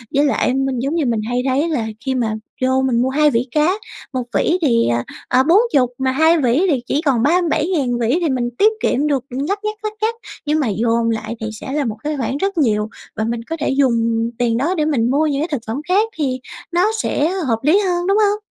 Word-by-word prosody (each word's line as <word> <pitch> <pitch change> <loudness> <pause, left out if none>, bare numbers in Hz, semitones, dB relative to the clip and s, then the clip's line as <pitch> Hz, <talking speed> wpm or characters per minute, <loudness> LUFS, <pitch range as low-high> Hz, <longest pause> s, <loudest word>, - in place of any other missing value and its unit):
Với 285 +1 +4
lại 280 - +1
anh 270 +1 +1
mình 265 -2 -2
giống 275 +6 -1
như 325 -4 +1
mình 230 -3 0
hay 245 0 0
thấy 285 +6 +1
là 240 -9 -1 0.2
khi 265 -1 0
mà 225 -4 0 0.3
vô 260 +1 +2
mình 250 -3 +1
mua 255 - +1
hai 300 +3 +3
vỉ 240 -1 0
cá, 310 +4 +3 0.4
1 255 -1 -1
vỉ 345 - +2
thì, 235 -7 +3
ờ, 120 0 0 0.2
ờ, 255 +1 +3
40 325 - +3
mà 265 0 0
2 320 +5 +4
vỉ 260 +8 +2
thì 275 -6 +1
chỉ 290 - 0
còn 255 -5 +2
37.000 320 -2 +1
một 240 - 0
vỉ 235 +7 +2
thì 335 - +1
mình 245 -3 -1
tiết 430 +2 +5
kiệm 290 +4 +1
được 275 -4 0
lắt 285 +11 -2
nhắt, 425 0 -2
lắt 430 0 -3
nhắt, 445 +2 +1 0.3
nhưng 300 +1 +1
mà 280 - 0
dồn 230 +2 +1
lại 220 0 -3
thì 220 - -2
sẽ 220 +5 -7
là 295 -1 0
một 215 -2 -3
cái 300 0 -2
khoản 265 +2 -2
rất 390 +3 -2
nhiều 215 -7 +1 0.3
và 220 - -1
mình 230 +1 -2
có 325 - -4
thể 300 - -1
dùng 230 -4 +1
tiền 235 -2 +1
đó 315 +9 0
để 305 -3 0
mình 250 -7 +1
mua 295 +3 +2
những 285 -1 -1
cái 320 - -1
thực 285 -5 -1
phẩm 230 +6 -3
khác 415 +5 +2
thì 265 -4 -1 0.3
nó 360 +5 +2
sẽ 300 +3 0 0.2
hợp 225 -3 +1
lý 310 +7 +4
hơn, 355 -3 0
đúng 395 +1 +3
hông? 420 0 +2
270 Hz, 250 wpm, -19 LUFS, 240-320 Hz, 0.4 s, tiết